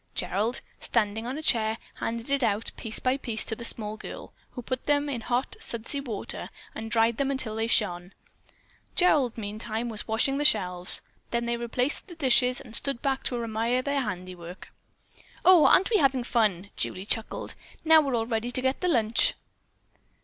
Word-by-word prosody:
Gerald, 200 +7 -1 0.2
standing 225 0 -1
on 260 +3 -3
a 315 - -6
chair, 220 -5 +2 0.2
handed 230 +3 -3
it 280 0 +2
out, 220 -2 0
piece 225 -1 -3
by 255 +1 +1
piece, 230 -5 -1
to 225 - -3
the 235 - -9
small 215 -2 0
girl, - - -9 0.2
who 245 - -7
put 255 +1 -4
them 290 0 +2
in 250 -5 -3
hot, 245 +3 -1
sudsy 235 +5 -2
water 230 -7 -5 0.2
and 220 - -6
then - - -6
dried 225 0 +2
them 275 -1 0
till 220 -5 -1
they 225 +1 -1
shone. 180 -5 +1 0.8
Gerald, 290 -10 +3
meantime, 220 +2 -4
was 215 -2 -2
washing 250 +5 +1
the - - +1
shelves. 180 -8 +2 0.3
Then 235 0 -1
they 235 0 0
replaced 245 +7 -1
the 350 - -10
dishes 255 -4 +3
and 225 - -6
stood 275 -2 +1
back 270 -1 0
to 240 -2 -1
admire 230 +3 0
their 280 0 0
handiwork. 180 -4 -7 0.7
"Oh, 360 -4 +8
aren't 390 - +4
we 435 - +5
having 270 -6 +2
fun?" 205 -6 +1
Julie 185 +1 -2
chuckled. 225 +2 -1 0.3
"Now, 320 0 +7
we're 275 -4 -1
all 225 -1 0
ready 225 0 -2
to 245 - 0
get 260 +1 0
the 365 - +1
lunch." 230 -8 +3
235 Hz, 185 wpm, -27 LUFS, 220-265 Hz, 0.8 s, Oh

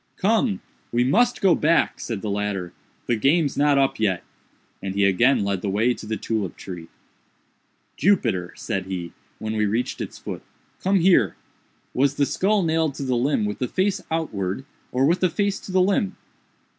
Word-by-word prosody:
"Come! 215 +1 +1 0.3
we 120 +1 +2
must 240 - +2
go 190 -3 +5
back," 165 +2 +2
said 115 -4 -4
the 105 - -2
latter, 100 -3 -2 0.3
"the 120 - +1
game's 140 +6 +2
not 145 -1 +3
up 135 -1 +2
yet;" 95 -5 +1 0.6
and 95 0 -4
he 100 0 +3
again 105 +5 +4
led 100 -2 -1
the 100 - -2
way 110 +5 +2
to 110 - -10
the 110 0 -2
tulip 110 -5 -3
tree. 85 -3 -8 1.1
"Jupiter," 115 - +2
said - - -3
he, 90 -3 -5 0.2
when 110 0 -4
we 105 -1 +2
reached 115 +5 -1
its - - -6
foot, - - -6 0.4
"come 190 0 +2
here! 165 - +4 0.6
was 140 +1 +2
the 145 - +2
skull 200 +6 +1
nailed 160 -3 +1
to 140 - -5
the 130 -1 0
limb 120 -2 +1
with 105 - -3
the 125 - 0
face 195 +5 0
outwards, 110 - -2 0.3
or 130 +2 +2
with 170 +5 +3
the 185 - +3
face 200 +2 0
to - - -9
the 185 0 +4
limb?" 195 0 +1
130 Hz, 180 wpm, -23 LUFS, -, 1.1 s, go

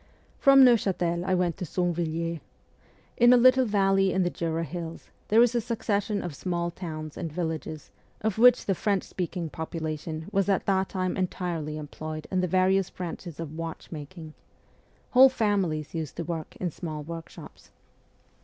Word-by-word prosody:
From 275 -1 +8
Neuchatel 185 -7 +2
I 185 - +2
went 175 -2 0
to - - -5
Sonvilliers. 170 -1 -1 0.8
In 240 +1 +7
a - - +7
little 255 +1 +5
valley 195 -2 +3
in 190 - +1
the 175 - 0
Jura 165 -1 -2
hills 165 0 -7 0.2
there 225 +3 +6
is 245 0 +2
a 240 - +1
succession 210 -2 -1
of 175 - -5
small 170 +2 -2
towns 155 -4 -7
and 165 - -4
villages 160 -2 -4 0.3
of 220 -1 -1
which 250 +1 +6
the 195 - +2
French 195 +1 0
speaking 175 -2 -4
population 160 0 -5
was 195 -1 +1
at 195 - +1
that 190 -1 +1
time 185 -1 -2
entirely 175 -5 -3
employed 155 +1 -6
in 185 -1 +1
the 180 - 0
various 185 +1 +2
branches 175 -2 -7
of 155 -2 -6
watchmaking; 160 0 -7 0.8
whole 260 +1 +8
families 195 - 0
used 160 -3 -4
to 170 - -3
work 160 -1 -5
in 180 -2 -3
small 155 -2 -6
workshops. 165 +1 -10
175 Hz, 160 wpm, -27 LUFS, 160-195 Hz, 0.8 s, From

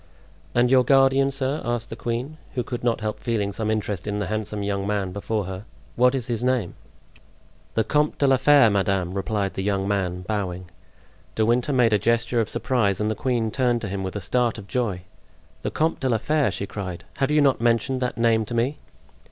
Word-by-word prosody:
"And 120 +1 +3
your 130 -1 +6
guardian, 135 +1 +4
sir," 135 +2 -2
asked 120 -1 -3
the - - -4
queen, 120 +6 -4 0.2
who 125 - 0
could 120 +1 -5
not 120 -2 +1
help 110 -1 -3
feeling 105 -4 -1
some 110 +1 -2
interest 105 -3 -2
in 105 0 -1
the 105 - -1
handsome 105 +1 -3
young 100 -1 -2
man 100 -3 -1
before 100 +1 -2
her, 95 +1 -6 0.3
"what 125 +2 +4
is 130 -4 -2
his 120 -1 -2
name?" 125 -7 0 1.0
"The 110 - +3
Comte 150 +6 +1
de 140 - +2
la 135 -1 +5
Fere, 140 -4 +6
madame," 95 -2 0
replied 100 0 -1
the - - -3
young 100 0 0
man, 90 -3 -1
bowing. 95 -3 -4 0.6
De 110 - +2
Winter 120 +5 +1
made 125 -4 +3
a 105 - +4
gesture 115 +2 +1
of 110 - -3
surprise 105 -7 0
and 105 0 0
the - - +1
queen 115 -2 -1
turned 120 -2 +1
to 105 - -3
him 95 0 -3
with 95 +1 -4
a 105 - -3
start 120 +5 0
of 105 - -9
joy. 100 -5 -2 0.6
"The - - -2
Comte 160 +1 0
de 130 - 0
la 115 - +3
Fere!" 150 +5 +1
she 100 - -4
cried. 95 -3 -6
"Have 135 0 +1
you 150 0 +3
not 135 -5 +3
mentioned 120 +2 +1
that 125 -3 -2
name 115 -1 +3
to 120 - -5
me?" 125 +6 0
115 Hz, 215 wpm, -24 LUFS, 100-125 Hz, 1.0 s, your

